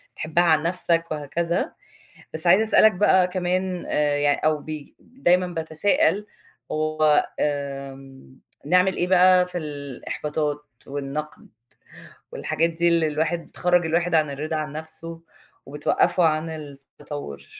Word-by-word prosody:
تحبّها 165 +2 +1
عن 155 -3 +3
نفْسَك 170 -1 0
وهكذا، 165 +3 -2 0.6
بس 160 +2 -1
عايزة 190 +5 +6
أسألك 220 0 +5
بقى 185 -1 +4
كمان 180 0 -2
آآ، 150 -1 +1
يعني 145 0 +2
أو 155 0 +3
ب 155 +1 -9 0.3
دايمًا 180 -8 +1
باتسائل 195 - +1 0.5
هو 155 -1 +2
آآ، 140 -2 -3 0.7
نعمل 180 +4 +3
إيه 175 - -1
بقى 185 0 +5
في 180 0 -6
الإحباطات 150 0 -4 0.2
والنقد 145 +2 -6 0.9
والحاجات 160 +2 -1
دي، 170 +1 +1
اللي 170 -2 +3
الواحد 160 +3 -2
بتخرّج 180 -1 +1
الواحد 170 +2 0
عن 155 -2 +3
الرِضا 155 +3 -4
عن 150 -2 -4
نفْسُه 165 +2 -6 0.4
وبتوقّفوا 150 +5 +1
عن 155 +1 +1
التطوّر؟ 145 - -9
160 Hz, 125 wpm, -23 LUFS, 150-175 Hz, 0.9 s, عايزة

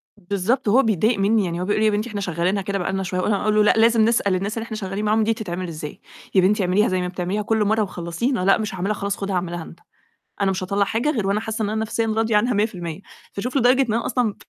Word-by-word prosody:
بالضبط. 205 +7 -1
هو 255 +6 +5
بيتضايق 220 +1 +1
منّي، 205 0 +2
يعني 170 0 -3
هو 180 - -2
بيقول 210 +1 0
لي: 220 - +2
"يا 215 - +4
بنتي 210 +3 -2
إحنا 205 -1 -4
شغّالينها 180 +2 -1
كده 195 +1 -2
بقى 190 0 -2
لنا 195 0 -1
شوية." 185 0 -3
وأنا 205 +1 0
أقول 215 0 +1
له: 215 - +5
"لأ، 210 - +5
لازم 225 0 +5
نسأل 220 -4 +2
الناس 200 +4 -3
اللي 225 - -3
إحنا 220 -2 -6
شغّالين 195 0 -4
معاهم 215 +1 +2
دي 225 - +2
تتعمل 185 -5 -5
إزاي؟" 155 -2 -7 0.4
"يا 190 - +6
بنتي 200 +2 +2
اعمليها 185 +4 +2
زي 185 -1 0
ما 180 - -2
بتعمليها 180 +3 -2
كل 220 +1 +1
مرّة، 220 +1 +2
وخلّصينا" 185 +7 -2
"لأ، 195 - +5
مش 215 -2 -4
هاعملها 190 +3 -1
خلاص، 200 -1 -3
خُدها 195 -1 -3
اعملها 175 -1 -3
أنت، 170 +1 -13 0.6
أنا 195 -1 +2
مش 185 0 -3
هاطَلّع 200 +2 +1
حاجة 225 +8 0
غير 215 -9 -1
وأنا 200 +2 +1
حاسّة 220 0 -3
إن 205 - -1
أنا 220 +1 -1
في 230 +1 -1
راضية 220 0 +1
عنها 240 +4 +1
100%" 190 -5 -2 0.3
فشوف 250 +7 -2
لدرجة 255 +1 +4
إن 235 -5 0
أنا 230 +1 -1
أصلًا 235 -4 0
205 Hz, 265 wpm, -22 LUFS, 185-220 Hz, 0.6 s, يا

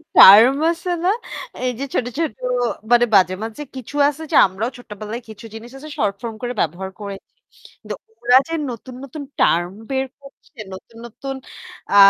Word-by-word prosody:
Term 230 +8 +10
আছে 340 +2 -5
না? 365 - +3 0.5
এই 250 - +1
যে - - -2
ছোট, 245 - +1
ছোট 320 -6 +1 0.6
মানে 240 0 +6
মাঝে, 185 -1 +5
মাঝে 225 +6 -6
কিছু 260 +2 -8
আছে 305 +2 -7
যে - - +1
আমরাও 195 +6 -3
ছোট্টবেলায় 215 0 -7
কিছু 220 +2 -10
জিনিস 235 +2 -9
আছে 305 +3 -10
শর্ট 200 -1 +1
ফর্ম 230 -2 -5
করে 245 0 -2
ব্যবহার 175 +4 -2
করেছি। 200 -1 -7 0.5
কিন্তু - - -5 0.3
ওরা 245 +2 +7
যে 330 - -5 0.2
নতুন, 245 +2 -9
নতুন 285 +2 -7 0.2
টার্ম 175 +2 +3 0.2
বের 265 0 +1 0.2
করছে, 275 -2 -17
নতুন, 225 +4 -12
নতুন 270 +4 -6 0.6
আ - - +3
240 Hz, 170 wpm, -21 LUFS, 205-270 Hz, 0.6 s, টার্ম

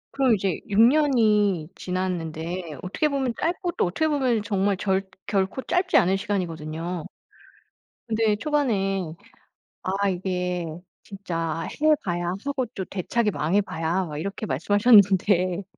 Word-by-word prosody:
그럼 265 -4 +3
이제 190 -4 -1
6 205 +2 +2
년이 220 - +4
지났는데 175 -2 -3
어떻게 195 +11 0
보면 265 -4 -1
짧고 350 +1 -1
또 - - 0
어떻게 315 - 0
보면 255 -7 +1
정말 200 -1 0
절 190 0 -1 0.2
결코 200 +5 -1
짧지 365 +1 +1
않은 190 +2 +4
시간이거든요. 170 -3 -3 1.0
근데 220 -1 +2
초반에 195 - 0 0.7
아 195 +1 0
이게 180 -1 -2 0.4
"진짜 165 -5 -4 0.2
해 310 0 +5
봐야 175 -1 -2 0.2
하고 275 -3 -1
또 195 -5 -6
대차게 210 +3 -1
망해 185 +7 +1
봐야." 170 +1 -2
막 150 -2 -6
이렇게 195 +6 -4
말씀하셨는데 195 - +4
195 Hz, 270 characters per minute, -25 LUFS, 175-225 Hz, 1.0 s, 해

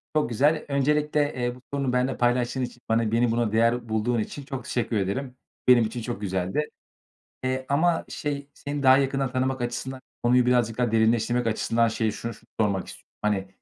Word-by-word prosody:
Çok 155 - +2
güzel. 145 +7 +2
Öncelikle, 150 +1 +1
eee, 120 -1 -2
bu 125 - -16
sorunu 140 -3 0
benimle 125 +1 +1
paylaştığın 120 +1 +1
için, 125 -1 -5
bana 115 -1 +2
beni 115 +1 +2
buna 115 -2 +1
değer 115 +1 +2
bulduğun 110 +2 +1
için 140 +6 -5
çok 135 -2 -6
teşekkür 115 -1 -1
ederim. 125 +7 -2 0.3
Benim 125 -2 +7
için 115 +2 -4
çok 120 -2 -5
güzeldi, 95 +9 -1 0.7
eee, 130 0 -1
ama 165 +4 +2
şey, 145 -1 -4
seni 145 0 -5
daha 130 0 +7
yakından 135 -1 0
tanımak 130 0 -1
açısından, 130 +2 -4 0.2
konuyu 125 +1 +4
birazcık 120 -3 +2
daha 120 -2 +1
derinleştirmek 115 +2 +2
açısından 115 +1 +2
şeye 110 -1 0
şunu 115 +2 -5 0.3
sormak 100 -3 +1
istiyorum: - - -13
Hani, 100 -2 0
125 Hz, 175 wpm, -26 LUFS, 115-135 Hz, 0.7 s, Benim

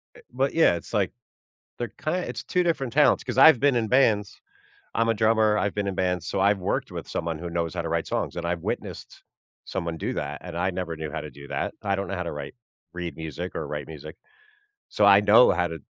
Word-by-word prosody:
Eh - - -14
but 130 +3 0
yeah, 165 - +5
it's, 85 - -7
like, - - +1 0.7
they're 120 -1 -3
kind 175 +4 -2
it's - - -5
2 180 - +1
different 140 -8 -1
talents, 150 +1 +4
'cause - - -4
I've 160 -6 +8
been 140 0 +3
in 115 -2 +1
bands- 110 -5 +2 0.6
I'm 115 +1 +2
a - - +4
drummer, 110 -1 +3
I've 100 - -1
been 105 -1 -1
in 100 - -1
bands, 90 -2 -1
so 95 - -2
I've 100 +1 +4
worked 90 - -2
with - - -6
someone 80 -1 -3
who 85 +1 -5
knows 85 -1 -2
how 85 - -1
to 85 - -3
write 85 0 -1
songs - - -2
and 85 - -4
I've 85 -1 -2
witnessed - - -5 0.4
someone 85 -3 -4
do - - -3
that, - - -4
and 85 -2 -7
I 90 +2 0
never 90 -2 -4
knew 80 -1 -6
how - - -4
to - - -8
do 70 0 -12
that. - - -2
I 100 -1 +1
don't 100 0 -3
know 100 - -3
how 90 - -3
to 85 - -4
write 75 +7 -7 0.4
read 90 -4 -5
music 80 -3 -6
or - - -3
write 75 -1 -5
music. 75 0 -10 0.7
So, 105 - +2
I 100 0 +8
know 105 +4 +7
how 90 0 +1
to 80 -2 -7
95 Hz, 240 wpm, -25 LUFS, 85-115 Hz, 0.7 s, I've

